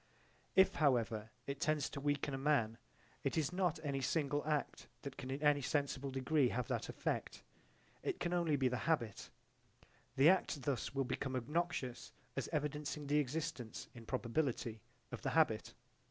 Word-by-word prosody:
If 190 0 +7
however 115 -7 +2 0.2
it 140 0 -4
tends 155 -2 +1
to 140 - -5
weaken 145 0 0
a - - -1
man 120 -6 +2 0.4
it 140 +2 0
is 155 +1 +1
not 180 -4 +1
any 140 -2 -1
single 145 +1 +1
act 150 -2 -1 0.2
that 140 -2 -5
can 130 - -6
in 135 +3 -3
any 145 -1 +5
sensible 140 0 0
degree 135 +1 +2
have 125 -2 -1
that - - -1
effect. - - -2 0.6
It - - -2
can 175 0 -1
only 170 -4 +2
be 130 -2 +3
the 125 +4 -1
habit: 120 -10 0 0.9
the 135 +2 +6
act 170 -6 +3
thus 135 0 -1
will 135 - +2
become 130 +1 -2
obnoxious 130 -2 -2 0.2
as 135 - -1
evidencing 150 -1 -2
the 145 +1 +3
existence, 150 -4 -3
in 115 -2 -11
probability, 120 -3 -1 0.3
of - - -5
the - - 0
habit. - - +3
140 Hz, 165 wpm, -37 LUFS, 130-150 Hz, 0.9 s, If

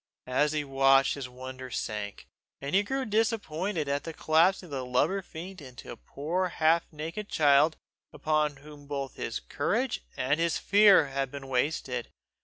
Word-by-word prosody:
As 145 +4 +1
he 150 -1 0
watched, 135 -1 +4
his 135 -3 -6
wonder 130 +1 -8
sank, 105 -4 -4 0.3
and 140 +1 -5
he 195 - +5
grew 265 +5 -2
disappointed 205 -6 -1
at 140 0 -1
the 165 - -6
collapsing 170 +5 +3
of 165 - -14
the 135 -2 -3
lubber 125 +10 +1
fiend 180 +1 -9
into 130 -3 -10
a - - -7
poor 155 - -2
half 165 0 +2
naked 165 +7 -6
child 150 +1 +4 0.3
upon 155 -1 0
whom 145 +1 -14
both 140 -2 -4
his - - -4
courage - - -1
and 145 +5 +1
his 170 0 +1
fear 200 -7 +5
had 135 0 -2
been 140 0 -8
wasted. 125 -2 -1
150 Hz, 165 wpm, -29 LUFS, 135-170 Hz, 0.3 s, he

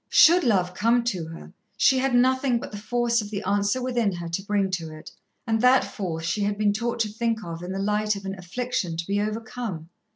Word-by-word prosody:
Should 350 +3 +6
love 185 -7 +2
come 230 +5 +2
to 185 -9 -2
her, 165 0 -10 0.2
she 265 -1 +4
had 265 -1 +1
nothing 255 0 +3
but - - -8
the 205 - -6
force 235 +2 +1
of 205 - -7
the 205 -1 -4
answer 205 +5 0
within 240 -5 +1
her 175 -1 -5
to 165 +3 -2
bring 200 -1 0
to 165 -3 -3
it, 155 0 -11 0.3
and 225 -2 0
that 255 +1 +5
force 165 -5 -4
she 170 +5 -1
had 205 0 0
been 210 -1 +2
taught 235 +2 -2
to 220 - +1
think 225 +1 -2
of 170 -1 -6
in 180 +1 -6
the 190 - -3
light 210 +1 0
of 200 -1 -8
an 195 - -3
affliction 185 -1 -3
to 170 - -3
be 200 +2 0
overcome. 215 -5 -4
210 Hz, 230 wpm, -25 LUFS, 185-235 Hz, 0.3 s, Should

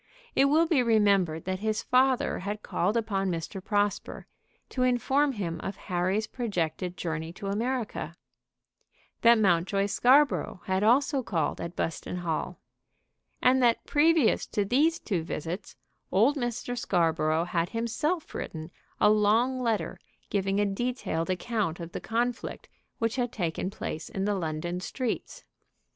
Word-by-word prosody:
It 270 - +5
will 310 +4 +4
be 315 -5 +3
remembered 200 -8 +2
that 185 0 -2
his 215 +1 -1
father 255 0 +2
had 205 +3 -4
called 200 +6 0
upon 195 -4 0
Mr. 170 +2 -4
Prosper, 205 -1 -1 0.4
to 255 - -3
inform 265 +3 +2
him 170 -7 -3
of 195 - -4
Harry's 185 +3 -1
projected 180 -6 -3
journey 160 -1 -3
to 200 - -9
America; 235 +3 -2 1.1
that 235 0 +7
Mountjoy 195 0 +2
Scarborough 255 -1 +3
had 190 0 0
also 265 +5 +3
called 170 -10 -1
at 170 +1 -5
Buston 165 - -3
Hall; 170 -3 -3 0.9
and 260 +1 +5
that 235 -2 +3
previous 305 -4 +3
to 205 - -1
these 300 +10 +3
two 185 -6 -2
visits 170 +4 -5 0.4
old 230 +10 +4
Mr. 245 -2 -3
Scarborough 165 -7 +1
had 170 -1 -1
himself 295 +9 -2
written 160 +1 -6 0.3
a 210 - +6
long 220 +5 +3
letter 230 -4 -1 0.3
giving 195 0 +1
a 205 - +3
detailed 200 -5 -2
account 185 -2 -1
of 170 0 -7
the - - -5
conflict 240 +2 -2 0.3
which 230 +2 -1
had 245 -2 0
taken 175 -3 -2
place 160 -5 -5
in 195 0 -2
the 205 - +1
London 175 -1 -3
streets. 240 +5 -4
205 Hz, 140 wpm, -28 LUFS, 180-245 Hz, 1.1 s, that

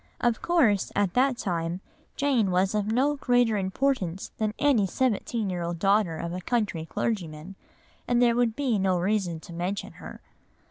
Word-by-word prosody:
Of 240 -2 +1
course 255 - +2
at 200 -3 +1
that 255 0 +2
time 170 -4 -2 0.4
Jane 265 -8 +1
was 185 +2 +1
of 210 -1 0
no 265 +6 +1
greater 245 -4 +2
importance 195 -2 -1
than 215 -1 -1
any 260 -9 +3
seventeen 230 -1 -1
year 175 -1 -3
old 170 0 -3
daughter 195 -2 +2
of 170 +1 -4
a 180 - -4
country 200 -7 -1
clergyman, 170 -4 -3 0.5
and 245 -1 +2
there 240 -1 +4
would 235 -2 +1
be 255 -7 0
no 190 -1 +2
reason 180 -2 0
to 170 - -11
mention 180 +4 -3
her. - - -9
205 Hz, 170 wpm, -26 LUFS, 180-240 Hz, 0.5 s, there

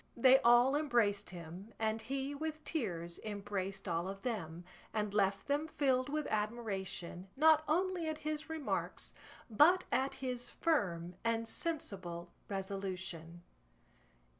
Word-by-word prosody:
They 260 +2 +7
all 240 +3 +6
embraced 235 -9 +2
him, 180 +4 -9
and 220 0 0
he 270 +4 -3
with 310 +1 -4
tears 175 - -2
embraced 200 -2 -3
all 170 +1 0
of 195 0 -6
them, 175 -9 -3 0.3
and 210 -2 0
left 195 -1 +1
them 290 +3 +1
filled 265 -4 +1
with 300 0 -1
admiration 195 -5 -2
not 310 +1 +6
only 350 +1 +1
at 310 - -2
his 305 +1 -4
remarks 320 -3 -2 0.3
but 300 - +6
at 270 +1 +1
his 250 -2 -3
firm 180 - 0
and 230 0 0
sensible 185 - -4 0.2
resolution. 190 -4 -4
220 Hz, 125 wpm, -35 LUFS, 190-285 Hz, 0.3 s, They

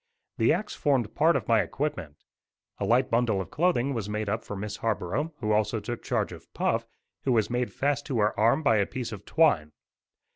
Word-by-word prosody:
The - - +4
axe 210 - -1
formed 130 -8 0
part 165 +3 +4
of - - -1
my 115 -2 +4
equipment. 95 - -3 0.6
A - - -1
light 125 +3 +2
bundle 115 -4 +2
of 95 - -5
clothing 150 -6 +1
was 110 -4 -3
made 105 0 -2
up 110 +2 -1
for 105 - -6
Miss 105 +1 -5
Harborough 115 - -1
who 110 -1 0
also 105 +1 +1
took 120 +3 -5
charge - - -1
of - - -12
Puff, - - 0 0.4
who 135 - +1
was 110 -1 +1
made 125 0 -1
fast 145 0 -1
to 130 - -1
her 105 -1 +1
arm 115 +8 +3
by 140 -6 +4
a 100 - +2
piece 125 -3 -5
of 105 -2 -8
twine. 100 - +2
115 Hz, 210 wpm, -27 LUFS, 105-135 Hz, 0.6 s, The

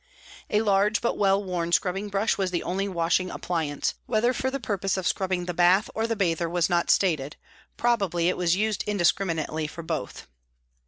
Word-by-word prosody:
A 210 +1 +2
large 205 +1 +2
but 235 - -1
well 195 0 +2
worn 175 -3 -3
scrubbing 195 +3 0
brush 200 +3 +1
was 190 -2 -1
the 175 -1 -2
only 195 +3 -2
washing 175 0 0
appliance, 160 -6 -2
whether 235 +2 +2
for 260 - -1
the 275 +1 -3
purpose 195 -4 -1
of 190 - -3
scrubbing 185 -2 -1
the 180 - -3
bath 180 +5 +3
or 225 +1 -1
the 230 - -1
bather 170 -4 0
was 175 +1 0
not 170 -1 +1
stated, 155 -6 +2 0.4
probably 195 -8 +1
it 180 - +1
was 175 -1 +1
used 215 +1 0
indiscriminately 170 -5 0
for 170 +2 -8
both. 160 -10 -5
185 Hz, 180 wpm, -26 LUFS, 170-205 Hz, 0.4 s, bath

